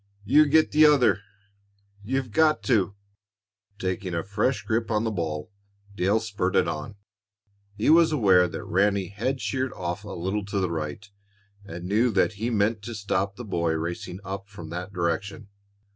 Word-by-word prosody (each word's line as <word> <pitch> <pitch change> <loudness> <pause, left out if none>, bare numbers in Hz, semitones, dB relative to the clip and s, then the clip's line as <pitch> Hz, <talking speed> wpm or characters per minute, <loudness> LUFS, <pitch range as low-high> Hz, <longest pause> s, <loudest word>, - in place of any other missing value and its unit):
You 150 +7 +5
get 155 +2 +4
the 155 +1 +5
other 125 -8 +4 0.8
you've 130 +2 -2
got 155 +4 +3
to!" 100 -6 +1 0.8
Taking 95 -2 -3
a 85 - -1
fresh 105 +7 -1
grip 115 -1 -1
on 110 -1 +1
the 115 - -1
ball, 80 -3 -4 0.4
Dale 100 +4 +2
spurted 105 -4 0
on. 75 +7 -5 0.8
He 105 +8 +2
was 165 0 +6
aware 95 -11 +4
that 80 -2 -6
Ranny 100 0 +1
had 120 +7 -2
sheered 130 -1 -2
off 90 +2 -4
a 105 - -9
little 95 +4 -3
to 100 0 -2
the 90 -2 -1
right, 80 +5 -4 0.6
and 90 -3 -8
knew 110 +6 +3
that 100 +3 +2
he 110 +4 -3
meant 110 -1 +1
to 120 +2 -7
stop 100 -1 -1
the 120 +2 -8
boy 85 -5 0
racing 85 +3 -4
up 95 +1 -6
from 85 -5 -10
that 90 +3 -5
direction. 95 +4 -3
100 Hz, 165 wpm, -26 LUFS, 90-115 Hz, 0.8 s, was